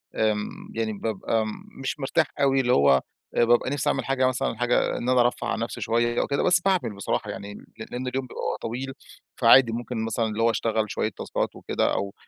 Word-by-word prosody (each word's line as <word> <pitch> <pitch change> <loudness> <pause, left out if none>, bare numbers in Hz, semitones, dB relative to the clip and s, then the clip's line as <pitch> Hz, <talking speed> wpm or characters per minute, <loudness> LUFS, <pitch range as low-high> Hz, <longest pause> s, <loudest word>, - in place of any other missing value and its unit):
آمم 105 -1 +1 0.3
يعني 110 -1 -1
بابقى 110 +1 -1
م 110 - -3 0.3
مش 135 - -3
مرتاح 155 +4 +1 0.2
أوي 135 -1 +4
اللي 125 -1 +2
هو 70 -1 +5 0.3
آآ 120 - +4
بابقى 120 +2 +3
نفسي 140 0 0
أعمل - - -1
حاجة 135 -1 +2
مثلًا 125 -3 -1
حاجة 120 +1 +1
إن 125 - -2
أنا 130 -1 +5
أرفَّه 120 0 0
عن - - -1
نفسي - - -4
شويّة 120 +1 +1
أو - - -2
كده. 140 - 0
بس 175 -1 +4
باعمل 185 - 0
بصراحة 100 - -2
يعني 100 +1 -7
ل - - -12 0.3
لإن 125 +1 -4
اليوم 130 +1 -2
بيبقى - - -3
طويل. 130 +4 -4 0.4
فعادي 120 0 +7
ممكن 115 -1 -3
مثلًا 115 +1 0
اللي 110 0 -2
هو 115 - +5
أشتغل 110 -2 0
شوية 110 - -1
تاسكات - - -3
وكده - - -1
أو 100 0 -2
120 Hz, 210 wpm, -25 LUFS, 110-130 Hz, 0.4 s, فعادي